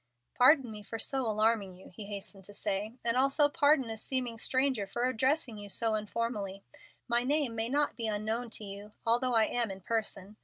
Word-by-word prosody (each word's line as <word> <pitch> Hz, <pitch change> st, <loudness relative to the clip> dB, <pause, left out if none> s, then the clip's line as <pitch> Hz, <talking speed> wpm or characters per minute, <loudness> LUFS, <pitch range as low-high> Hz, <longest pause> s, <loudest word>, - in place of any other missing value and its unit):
"Pardon 255 Hz, -1 st, +5 dB
me 210 Hz, -1 st, -8 dB
for 225 Hz, +2 st, -6 dB
so 265 Hz, +1 st, -1 dB
alarming 215 Hz, -3 st, +1 dB
you," 185 Hz, -, -14 dB
he 210 Hz, -, -7 dB
hastened 200 Hz, -1 st, -7 dB
to 205 Hz, -, -9 dB
say, 205 Hz, +3 st, -2 dB
"and 230 Hz, 0 st, +2 dB
also 275 Hz, +3 st, +4 dB
pardon 285 Hz, -2 st, +3 dB
a 220 Hz, -, -5 dB
seeming 245 Hz, -1 st, -2 dB
stranger 260 Hz, -5 st, +1 dB
for 240 Hz, +5 st, -1 dB
addressing 255 Hz, -1 st, 0 dB
you 205 Hz, 0 st, -8 dB, 0.3 s
informally. 210 Hz, -2 st, -3 dB, 0.4 s
My 240 Hz, 0 st, +3 dB
name 285 Hz, -2 st, +1 dB
may 225 Hz, +1 st, 0 dB
not 290 Hz, +2 st, +1 dB
be 230 Hz, -2 st, -1 dB
unknown 220 Hz, +3 st, -2 dB
to 220 Hz, -, -6 dB
you, 205 Hz, +1 st, -8 dB
although 240 Hz, +2 st, +2 dB
I 220 Hz, -1 st, +5 dB
am 235 Hz, -1 st, -1 dB
in 195 Hz, 0 st, -7 dB
person. 210 Hz, -1 st, -3 dB
230 Hz, 190 wpm, -31 LUFS, 210-255 Hz, 0.4 s, Pardon